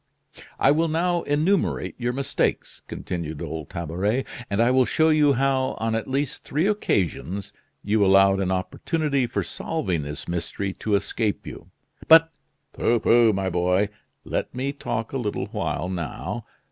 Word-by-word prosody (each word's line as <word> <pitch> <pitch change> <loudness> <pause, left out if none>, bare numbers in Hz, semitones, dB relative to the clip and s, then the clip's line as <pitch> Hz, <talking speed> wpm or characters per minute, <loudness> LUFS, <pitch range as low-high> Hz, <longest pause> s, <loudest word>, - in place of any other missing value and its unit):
"I - - +5
will 160 +3 +2
now 170 +2 +1
enumerate 155 +7 +1
your 120 0 0
mistakes," 135 +2 -2
continued 80 -4 -5
old 80 -2 -5
Tabaret, 95 - -1 0.2
"and 100 - -1
I 120 +2 +4
will 130 0 +5
show 160 +7 +3
you 150 -2 +4
how, 135 0 +1
on 115 0 -1
at 115 0 -2
least 135 +1 -2
three 155 +5 0
occasions, 100 - -1 0.3
you 105 0 +2
allowed 95 0 +5
an 95 -2 0
opportunity 135 - -1
for 120 - -2
solving 95 - -2
this 75 0 -7
mystery 90 +3 -3
to 105 +1 -1
escape 105 +1 -1
you." - - -9 0.4
"But 165 0 +7 0.2
" - - -49
"Pooh! 120 0 +2
pooh! 115 -1 +5
my 95 -2 -1
boy, 90 +4 +2 0.4
let - - -3
me 135 +2 -2
talk 120 -5 -4
a 135 - -1
little 105 -4 -2
while 90 - -2
now. 85 -5 -4
115 Hz, 160 wpm, -24 LUFS, 95-140 Hz, 0.4 s, But